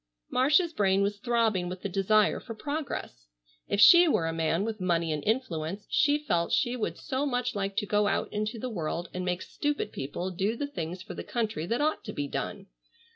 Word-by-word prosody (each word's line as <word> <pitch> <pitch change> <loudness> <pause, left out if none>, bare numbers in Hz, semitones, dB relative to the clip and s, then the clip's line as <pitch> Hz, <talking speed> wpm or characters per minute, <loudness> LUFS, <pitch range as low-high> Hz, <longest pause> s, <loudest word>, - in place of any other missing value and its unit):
Marcia's 300 +7 +3
brain 195 -5 +2
was 205 +1 -1
throbbing 225 -6 +1
with 185 0 -7
the - - 0
desire 200 +2 +2
for 225 - -8
progress. 280 - -5 0.4
If 200 - -1
she 345 - +9
were 175 - +2
a 165 - -1
man 165 +4 0
with 220 -3 -4
money 170 -3 +1
and 150 -1 -2
influence 200 -6 -2
she 290 0 +4
felt 175 - -1
she 245 +1 +2
would 230 - -3
so 270 -2 -2
much 250 -3 -1
like 195 -1 -3
to 210 - +1
go 205 0 +2
out - - -1
into 215 +2 -2
the 255 - -4
world 175 -5 -3
and 185 - -3
make 180 0 -2
stupid 295 -1 -2
people 175 +7 -4
do 195 +5 -1
the 285 - -2
things 180 - -5
for - - -8
the - - -6
country 220 -8 -2
that 235 +7 0
ought 310 +1 0
to - - -5
be 145 0 -3
done. 195 +6 -4
205 Hz, 210 wpm, -28 LUFS, 180-250 Hz, 0.4 s, she